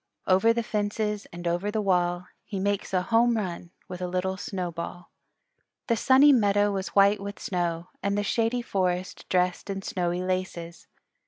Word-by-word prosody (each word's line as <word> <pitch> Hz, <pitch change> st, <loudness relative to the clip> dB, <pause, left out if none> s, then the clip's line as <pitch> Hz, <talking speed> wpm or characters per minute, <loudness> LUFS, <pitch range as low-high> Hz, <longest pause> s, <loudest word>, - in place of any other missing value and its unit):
Over 190 Hz, +5 st, +4 dB
the 235 Hz, 0 st, 0 dB
fences 210 Hz, -1 st, -2 dB
and 175 Hz, 0 st, -6 dB
over 175 Hz, +4 st, 0 dB
the 215 Hz, +1 st, -1 dB
wall 180 Hz, -3 st, +1 dB, 0.2 s
He 200 Hz, -3 st, -5 dB
makes 200 Hz, +1 st, -1 dB
a 185 Hz, -1 st, +1 dB
home 230 Hz, +3 st, +3 dB
run 175 Hz, -4 st, -4 dB, 0.2 s
with 180 Hz, 0 st, -7 dB
a 180 Hz, -, -1 dB
little 185 Hz, +1 st, -1 dB
snowball. 175 Hz, -2 st, -5 dB, 0.7 s
The 230 Hz, -, +2 dB
Sunny 265 Hz, +5 st, +6 dB
Meadow 205 Hz, -3 st, +3 dB
was 195 Hz, -1 st, -2 dB
white 200 Hz, +1 st, +5 dB
with 200 Hz, 0 st, -6 dB
snow, 175 Hz, -2 st, -2 dB
and 200 Hz, +1 st, 0 dB
the 205 Hz, -, +1 dB
Shady 230 Hz, +3 st, 0 dB
Forest 185 Hz, -3 st, -2 dB
dressed 180 Hz, +1 st, 0 dB
in 195 Hz, 0 st, -4 dB
snowy 180 Hz, -1 st, -1 dB
laces. 185 Hz, -2 st, -4 dB
190 Hz, 165 wpm, -27 LUFS, 180-210 Hz, 0.7 s, Sunny